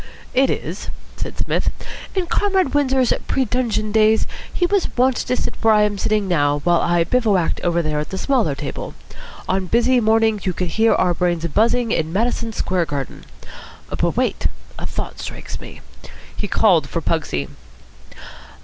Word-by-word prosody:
"It 265 +1 +3
is," - - -4 0.3
said - - -6
Psmith. - - 0 0.5
"In 375 -2 +1
Comrade 380 -5 +1
Windsor's 265 -4 +3
pre 265 - +1
dungeon 220 -3 -1
days 220 0 +4 0.3
he 355 - +1
was 395 +1 +1
wont 255 +1 +4
to 250 - -1
sit - - -2
where 225 -1 +5
I 210 - +5
am 205 -1 0
sitting 210 -1 +1
now, 145 -5 +2
while 175 +1 +3
I 175 -1 +2
bivouacked 205 -3 +1
over 170 -1 +1
there 155 -1 -1
at 150 - -4
the 190 - -4
smaller 220 - +1
table. 140 -1 -6 0.5
On 190 0 0
busy 240 +5 +3
mornings 220 -2 +2
you 185 - +1
could 180 0 -2
hear 225 +6 +3
our 180 -1 +2
brains 175 -1 0
buzzing 230 +7 +2
in 160 -7 0
Madison 230 +3 0
Square 185 -4 0
Garden. 140 -3 -5 0.7
But - - -1
wait! - - +1 0.3
A - - -4
thought - - -5
strikes - - -7
me." - - -11 0.5
He - - -3
called - - +3
for - - -2
Pugsy. 70 -1 -1
215 Hz, 165 wpm, -20 LUFS, 175-245 Hz, 0.7 s, where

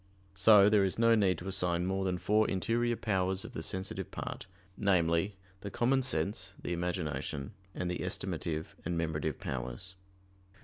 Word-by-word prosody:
So 100 +1 +7
there 105 -1 +5
is 95 - 0
no 115 0 +5
need 100 -5 +3
to 90 - -8
assign 90 -2 +2
more 95 +1 -1
than 90 -1 0
four 105 +4 +2
interior 120 +5 0
powers 95 -2 0
of 120 - -9
the - - -4
sensitive 95 0 -4
part - - -6 0.3
namely, 90 -1 +2 0.2
the 100 - -6
common 130 +6 +2
sense, 100 -7 -1
the - - -3
imagination, 85 -5 -3 0.2
and 90 - -2
the 90 - -2
estimative 80 -1 -3
and 85 0 -2
memorative 80 -2 -1
powers. 65 +8 -4
95 Hz, 160 wpm, -32 LUFS, 85-105 Hz, 0.3 s, So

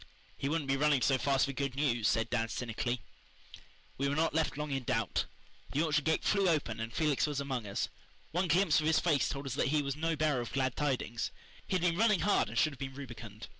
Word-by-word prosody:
"He 140 - -2
wouldn't 155 -2 -1
be 135 0 +2
running 145 -2 +3
so 135 -2 +3
fast 135 0 +2
for 140 - -3
good 140 -1 -3
news," 120 -6 +1
said 115 - +1
Dan 115 -2 0
cynically. 120 0 -2 1.0
We 140 0 +1
were 140 - 0
not 160 +2 +1
left 160 -3 0
long 150 -1 -3
in 135 -1 -1
doubt. 115 -3 0 0.5
The 145 +4 +2
orchard 150 -2 +1
gate 160 0 +1
flew 200 -3 +3
open 140 -9 0
and 115 +1 -4
Felix 150 +2 +1
was 145 -2 -2
among 130 -6 -3
us. 100 - -1 0.4
One 180 +3 0
glimpse 170 -1 +4
of 155 - 0
his 160 - +4
face 155 -5 +2
told 140 -1 -4
us 135 - -3
that 140 - +1
he 150 +1 +2
was 140 -1 -2
no 165 +2 0
bearer 150 -4 +1
of 120 - -7
glad 130 -2 0
tidings. 130 -5 -1 0.4
He - - 0
had 180 - 0
been 170 -1 +2
running 215 -3 +4
hard 205 - +2
and - - -6
should 155 - +3
have 130 - -13
been 135 -1 -5
rubicund. 115 -5 -9
140 Hz, 240 wpm, -32 LUFS, 125-155 Hz, 1.0 s, glimpse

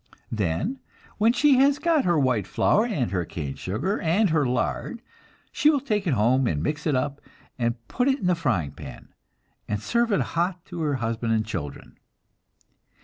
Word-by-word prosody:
Then, 110 - -1 0.4
when 220 +2 +5
she 280 +1 +4
has 280 +1 +4
got 330 -3 +2
her 175 -2 +3
white 125 -8 +1
flour, 220 +3 +2
and 150 - -1
her 90 -3 0
cane 75 -4 -5
sugar, 145 - -2
and 180 +4 +2
her 150 -4 +2
lard, 125 - -2 0.5
she 300 - +3
will 295 -2 +3
take 210 -7 -1
it 145 - +2
home, 120 +4 +3
and 75 -5 -1
mix 150 - -2
it 150 - +2
up, 140 +2 -2 0.4
and 115 -1 +1
put 250 +1 0
it 270 -1 +3
in 225 - -5
the 180 - +4
frying 120 - 0
pan, 70 - -11 0.6
and 105 -1 -2
serve 235 - 0
it 200 - +2
hot 175 +1 -1
to 175 -3 -6
her 150 -3 0
husband 115 -1 -1
and 110 -1 +1
children. 80 -10 -7
150 Hz, 185 wpm, -25 LUFS, -, 0.6 s, when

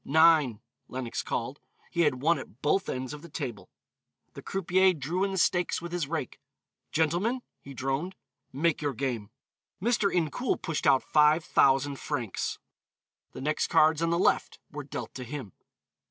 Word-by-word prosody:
"Nine," 155 -6 +5 0.3
Lenox 125 -2 -4
called; 125 +4 -3 0.3
he 170 - +1
had 140 -5 +1
won 165 -1 +3
at 130 -1 -12
both 190 +6 +2
ends 130 +1 -3
of 150 - -8
the 170 - -11
table. 130 -8 -5 0.6
The - - -9
croupier 190 0 +2
drew 165 +5 -2
in 200 - +1
the - - -2
stakes 175 0 +2
with 170 0 -7
his 175 -4 -1
rake. 155 -4 -4 0.5
"Gentlemen," 175 +11 +1 0.2
he 140 -1 -11
droned, 135 +9 -2 0.4
"make 155 +4 +1
your 145 -3 -1
game." 120 -5 -3 0.5
Mr. 215 -1 +2
Incoul 175 - 0
pushed 165 -4 -2
out 135 -2 +5
five 150 +2 +4
thousand 135 +1 +3
francs. 125 -10 -3 0.8
The - - -7
next 150 +3 0
cards 155 0 +4
on 165 - +2
the 170 - +2
left 180 - +2
were 150 -1 -6
dealt 140 - -6
to 130 - -6
him. 125 -5 -6
150 Hz, 165 wpm, -28 LUFS, 135-170 Hz, 0.8 s, Nine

